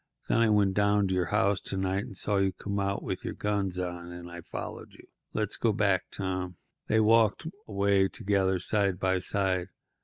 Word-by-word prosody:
Then -, -, +2 dB
I 115 Hz, -1 st, +4 dB
went 100 Hz, -2 st, +3 dB
down 100 Hz, 0 st, +3 dB
to -, -, 0 dB
your 90 Hz, -1 st, +1 dB
house 100 Hz, -2 st, +2 dB
to 95 Hz, -, -5 dB
night 95 Hz, +1 st, 0 dB
and 95 Hz, -, -9 dB
saw 100 Hz, 0 st, +2 dB
you 95 Hz, -1 st, +2 dB
come 100 Hz, +2 st, -4 dB
out 100 Hz, 0 st, -1 dB
with -, -, -4 dB
your -, -, -4 dB
guns 100 Hz, -3 st, -1 dB
on, 90 Hz, -1 st, -4 dB
and 85 Hz, 0 st, -9 dB
I 85 Hz, 0 st, -8 dB
followed -, -, -7 dB
you. -, -, -16 dB, 0.3 s
Let's 105 Hz, -, -1 dB
go 115 Hz, -2 st, +2 dB
back, 100 Hz, -3 st, +2 dB
Tom." 95 Hz, -2 st, -3 dB, 0.3 s
They 110 Hz, -, +3 dB
walked 110 Hz, -, +4 dB, 0.2 s
away 100 Hz, -1 st, +2 dB
together, 95 Hz, -2 st, +1 dB
side 100 Hz, 0 st, +1 dB
by 95 Hz, 0 st, +1 dB
side. 95 Hz, -1 st, 0 dB
95 Hz, 195 wpm, -29 LUFS, 95-105 Hz, 0.3 s, I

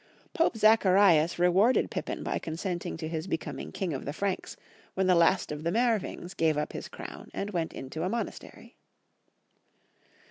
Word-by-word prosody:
Pope 330 Hz, -, +1 dB
Zacharias 195 Hz, -6 st, +5 dB
re 175 Hz, +1 st, +4 dB
warded 205 Hz, +8 st, +3 dB
Pippin -, -, -4 dB
by -, -, -2 dB
consenting 170 Hz, +2 st, -4 dB
to 160 Hz, -1 st, -5 dB
his 160 Hz, +2 st, -4 dB
becoming 165 Hz, -3 st, -4 dB
king 185 Hz, -5 st, -3 dB
of 135 Hz, -, -4 dB
the 145 Hz, -, -3 dB
Franks 195 Hz, +3 st, -3 dB, 0.4 s
when 190 Hz, -, +1 dB
the 185 Hz, -, +5 dB
last 170 Hz, +1 st, +3 dB
of 150 Hz, 0 st, -5 dB
the 170 Hz, -, 0 dB
Meerwings 225 Hz, -5 st, 0 dB
gave 160 Hz, -2 st, +1 dB
up 150 Hz, -, -2 dB
his -, -, -6 dB
crown -, -, -9 dB
and 200 Hz, +1 st, -3 dB
went 170 Hz, -4 st, -2 dB
into 135 Hz, +4 st, -6 dB
a 180 Hz, -, 0 dB
monastery. 235 Hz, +2 st, -6 dB
180 Hz, 170 wpm, -29 LUFS, 160-200 Hz, 0.4 s, Zacharias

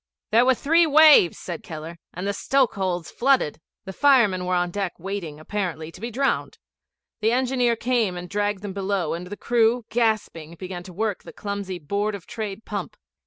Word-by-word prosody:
'There 230 Hz, +3 st, +5 dB
were 260 Hz, 0 st, +4 dB
three 330 Hz, +6 st, +3 dB
waves,' 300 Hz, -, +7 dB
said 175 Hz, -3 st, -6 dB
Keller; 165 Hz, +1 st, -8 dB
'and 180 Hz, +2 st, -6 dB
the 200 Hz, -, 0 dB
stokehold's 195 Hz, -9 st, 0 dB
flooded.' 245 Hz, -, +1 dB, 0.2 s
The 190 Hz, -, -6 dB
firemen 215 Hz, -9 st, +4 dB
were 180 Hz, -, +1 dB
on 175 Hz, 0 st, 0 dB
deck 195 Hz, -2 st, -2 dB
waiting, 175 Hz, -4 st, -5 dB
apparently, 165 Hz, -3 st, -4 dB
to 180 Hz, -, -14 dB
be 235 Hz, -, -3 dB
drowned. 270 Hz, +4 st, -1 dB, 0.6 s
The 220 Hz, +1 st, +2 dB
engineer 250 Hz, -1 st, +2 dB
came 230 Hz, -6 st, 0 dB
and 175 Hz, 0 st, -6 dB
dragged 205 Hz, 0 st, -1 dB
them 200 Hz, -2 st, -5 dB
below, 195 Hz, -3 st, -1 dB
and 175 Hz, +2 st, -5 dB
the 205 Hz, +2 st, -7 dB
crew, 235 Hz, +1 st, +2 dB
gasping, 215 Hz, -8 st, -1 dB
began 180 Hz, 0 st, -6 dB
to 185 Hz, -, -9 dB
work 210 Hz, +1 st, -2 dB
the -, -, -11 dB
clumsy 200 Hz, -2 st, -5 dB
Board 200 Hz, +6 st, -2 dB
of 195 Hz, -, -10 dB
Trade 215 Hz, -1 st, -6 dB
pump. -, -, -5 dB
200 Hz, 180 wpm, -24 LUFS, 180-235 Hz, 0.6 s, waves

